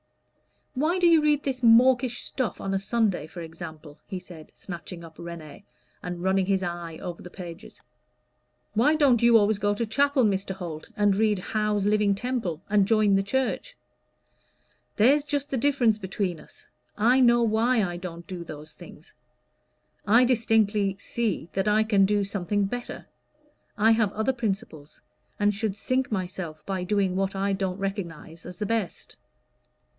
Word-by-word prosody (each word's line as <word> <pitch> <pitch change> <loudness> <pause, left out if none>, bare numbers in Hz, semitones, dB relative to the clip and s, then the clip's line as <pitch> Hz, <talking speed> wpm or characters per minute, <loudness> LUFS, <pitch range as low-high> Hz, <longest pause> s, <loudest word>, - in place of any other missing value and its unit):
"Why 310 +7 +1
do 360 - +2
you 330 -2 +6
read 300 -1 +2
this 260 -2 -3
mawkish 245 +1 +4
stuff 255 -5 -3
on 195 - -3
a 195 - +1
Sunday, 200 -6 0
for 175 - -9
example?" 160 -2 -10
he 190 - -5
said, 175 -4 -13
snatching 175 -1 -8
up 160 -1 -13
"Réné," 170 +1 -9 0.4
and 175 -1 -6
running 190 0 +1
his 195 -1 +1
eye 170 -2 -5
over 175 -2 -6
the 180 - -10
pages. 180 +1 -10 0.9
"Why 270 +8 +3
don't 275 -7 +4
you 235 -1 +6
always 210 -1 +2
go 205 0 +1
to 230 - -1
chapel, 280 +4 +2
Mr. 195 -2 0
Holt, 170 -5 -7
and 205 -1 +3
read 210 0 +2
Howe's 210 +1 -1
'Living 210 -1 +2
Temple,' 200 -8 -3
and 205 -1 +3
join 215 -2 +3
the 195 - +3
church?" 265 - -2 1.2
"There's 275 +7 +4
just 285 0 -3
the 270 - 0
difference 245 -5 +2
between 190 -3 -3
us - - -16 0.3
I 245 +5 +4
know 240 -2 +5
why 225 +1 +2
I 175 -2 -3
don't 170 -1 -8
do 180 -2 -7
those 155 -1 -9
things. - - -14 0.9
I 230 +5 +6
distinctly 215 -4 +2
see 200 -5 -3
that 195 +1 -1
I 215 +1 +4
can 205 -3 +3
do 205 +1 +1
something 200 +1 -1
better. 245 +4 -6 0.7
I 220 +2 +4
have 220 -3 +2
other 220 +5 0
principles, 195 - -5 0.4
and 205 0 +3
should 205 -1 -3
sink 255 +4 -1
myself 180 -5 -4
by 190 -2 -3
doing 195 -1 0
what 195 0 -1
I 195 +1 0
don't 190 -1 -2
recognize 175 -5 -6
as 180 - -9
the 210 - -3
best." 220 -3 -3
205 Hz, 165 wpm, -26 LUFS, 180-235 Hz, 1.2 s, you